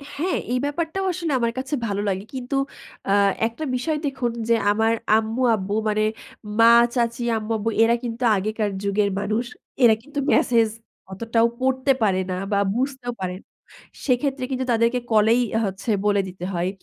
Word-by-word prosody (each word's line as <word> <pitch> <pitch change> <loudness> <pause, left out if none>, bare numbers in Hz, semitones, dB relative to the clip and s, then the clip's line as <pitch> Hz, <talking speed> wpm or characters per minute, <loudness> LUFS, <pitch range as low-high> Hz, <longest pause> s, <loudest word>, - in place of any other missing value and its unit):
হ্যাঁ, 350 +5 -1 0.2
এই 250 - +1
ব্যাপারটাও 325 +6 -2
আসলে 330 -3 -3
আমার 235 0 +1
কাছে 265 +2 -4
ভালো 200 0 -2
লাগে। 190 +1 -2
কিন্তু 255 +1 -4 0.5
আ - - +4 0.3
একটা 235 +7 -7
বিষয় 300 +5 -1
দেখুন 260 -4 -1 0.2
যে 230 - +5 0.2
আমার 225 +2 +2 0.2
আম্মু-আব্বু 220 -3 0
মানে 215 0 +1 0.6
মা 230 +1 +8 0.2
চাচী 235 0 0
আম্মু-আব্বু 220 0 -2
এরা 235 +1 +4
কিন্তু 235 +1 -4
আগেকার 215 +2 -1
যুগের 200 0 +1
মানুষ। 215 +4 -1 0.4
এরা 225 -2 +7
কিন্তু 290 +3 -6
মেসেজ 230 -2 +3 0.4
অতটাও 230 +3 +1
পড়তে 260 +1 +2
পারে 190 -3 +2
না - - -1 0.2
বা 200 - +2 0.2
বুঝতেও 255 -1 -2
পারে, 180 -1 -3 0.7
সেক্ষেত্রে 270 0 0
কিন্তু 260 0 -1
তাদেরকে 230 +2 +2
কলেই 220 +3 +4 0.2
হচ্ছে 195 +3 -5 0.2
বলে 205 -1 +3
দিতে 180 -1 -7
হয়। 175 +1 0
230 Hz, 155 wpm, -23 LUFS, 210-255 Hz, 0.7 s, মা